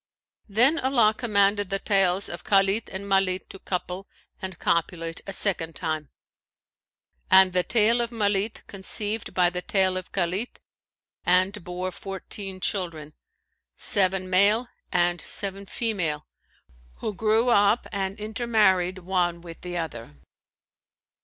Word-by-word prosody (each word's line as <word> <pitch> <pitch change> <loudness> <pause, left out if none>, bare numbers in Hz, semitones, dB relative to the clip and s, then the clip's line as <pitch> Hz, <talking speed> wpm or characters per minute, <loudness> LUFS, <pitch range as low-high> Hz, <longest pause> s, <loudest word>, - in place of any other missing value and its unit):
Then 250 +10 +4
Allah 245 -6 +3
commanded 205 -3 +1
the 195 - 0
tails 195 -1 +2
of 170 - -6
Khalit 195 +2 +2
and 190 +1 -5
Malit 195 -1 0
to 195 - -10
couple 180 +1 -4 0.3
and 190 -3 -6
copulate 165 0 -1
a - - -3
second 175 -5 +1
time, 155 -3 -3 1.2
and 190 -1 +6
the 180 - +3
tail 230 +4 +3
of 235 - -1
Malit 210 -2 -1
conceived 205 +2 -3
by 180 -1 +3
the 180 0 -3
tail 190 -1 +2
of 185 - -7
Khalit 190 +5 -1 0.7
and 185 +2 +2
bore 180 +1 -4
fourteen 195 +1 -5
children, 170 -6 -2 0.6
seven 190 -1 +2
male 205 +6 +3 0.2
and 175 0 +1
seven 195 -1 -3
female, 180 -12 -2 0.7
who 215 - -4
grew 220 +4 +2
up 205 0 +3
and 195 +1 -3
intermarried 210 -5 +1
one 180 -2 -1
with 170 -1 -11
the 175 -1 -5
other. 120 - -6
190 Hz, 125 wpm, -25 LUFS, 180-210 Hz, 1.2 s, and